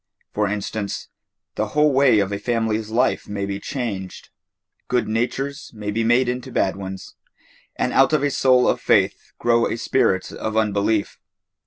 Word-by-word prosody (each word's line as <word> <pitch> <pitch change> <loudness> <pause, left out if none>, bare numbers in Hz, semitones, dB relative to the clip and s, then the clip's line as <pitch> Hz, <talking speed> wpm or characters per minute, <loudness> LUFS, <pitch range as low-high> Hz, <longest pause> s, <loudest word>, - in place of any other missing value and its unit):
For 105 0 +1
instance, 100 0 -4 0.4
the 110 - -1
whole 150 -1 +4
way 135 -4 +5
of 100 -1 +1
a 100 - -3
family's 110 -2 -1
life 125 +4 +1
may 100 -1 -3
be 100 0 -4
changed. 100 -8 -5 0.6
Good 125 -1 0
natures 135 +6 -2
may 105 -1 -4
be 115 +2 0
made 120 +3 +3
into 125 +1 -3
bad 95 - +1
ones 95 -1 -8 0.6
and - - -1
out 135 - +5
of 155 -2 +2
a 145 - +1
soul 130 -2 +4
of - - +1
faith - - +1
grow 120 0 +2
a - - -3
spirit 115 -6 +1
of 110 0 -4
unbelief. 105 -1 0
110 Hz, 165 wpm, -22 LUFS, 100-125 Hz, 0.6 s, way